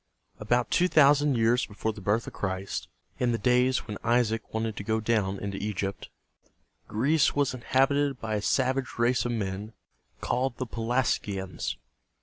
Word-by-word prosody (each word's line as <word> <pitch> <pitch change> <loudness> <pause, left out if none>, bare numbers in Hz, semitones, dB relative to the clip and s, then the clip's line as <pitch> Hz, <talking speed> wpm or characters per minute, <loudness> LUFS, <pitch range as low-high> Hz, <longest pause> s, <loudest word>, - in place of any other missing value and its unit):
About 120 0 0
two 180 - +4
thousand 145 -3 +5
years 115 +2 +2
before 110 +1 -3
the 105 - -10
birth 105 +4 +1
of - - -8
Christ, 95 0 -3 0.3
in 125 -2 +1
the - - +1
days 125 +3 +2
when 105 -3 -6
Isaac 115 -1 +1
wanted 110 -1 -2
to - - -4
go 110 +2 0
down 105 -3 0
into 100 0 -4
Egypt, 100 -2 -3 0.8
Greece 140 +8 +2
was 145 -2 +1
inhabited 135 +2 +1
by 110 -1 -3
a 105 - 0
savage 130 +3 0
race 120 +2 +2
of 120 - -1
men 105 -1 -3 0.5
called 125 0 -1
the 130 - -2
Pe 115 - -11
las´gi 115 -4 0
ans. 95 -3 -4
115 Hz, 165 wpm, -28 LUFS, 105-130 Hz, 0.8 s, thousand